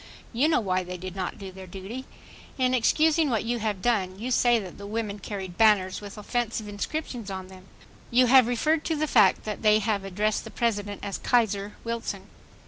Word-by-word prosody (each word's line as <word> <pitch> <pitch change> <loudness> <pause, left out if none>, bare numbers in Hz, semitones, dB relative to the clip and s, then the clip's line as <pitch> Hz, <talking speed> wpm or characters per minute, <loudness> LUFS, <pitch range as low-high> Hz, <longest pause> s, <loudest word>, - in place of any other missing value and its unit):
You 255 +6 +3
know 320 - +3
why 185 -4 0
they 180 0 -6
did 185 +1 -7
not 185 -2 -3
do 195 -3 -8
their 190 0 -10
duty. 195 +8 -7 0.5
In 255 -1 +2
excusing 310 +5 +3
what 225 -4 0
you 240 +1 -1
have 210 -4 -2
done, 190 -6 +1
you 240 +5 -4
say 240 -1 +4
that 190 -5 -7
the 200 - -7
women 210 -1 -3
carried 190 -3 -6
banners 205 -4 +4
with 205 +1 -9
"offensive" 225 0 -2
inscriptions 230 +2 -4
on 190 -1 -6
them. 190 0 -14 0.4
You 250 +1 +5 0.2
refer 245 +7 +1
to 320 +1 -2
the 310 +1 0
fact 210 -10 +4
that 210 -1 -5
they 215 -1 +5
have 210 -2 0
addressed 205 +2 -1
the - - -9
President 205 -4 -2
as 200 - -4
"Kaiser 210 -4 +1
Wilson." 230 0 -4
210 Hz, 195 wpm, -26 LUFS, 195-240 Hz, 0.5 s, You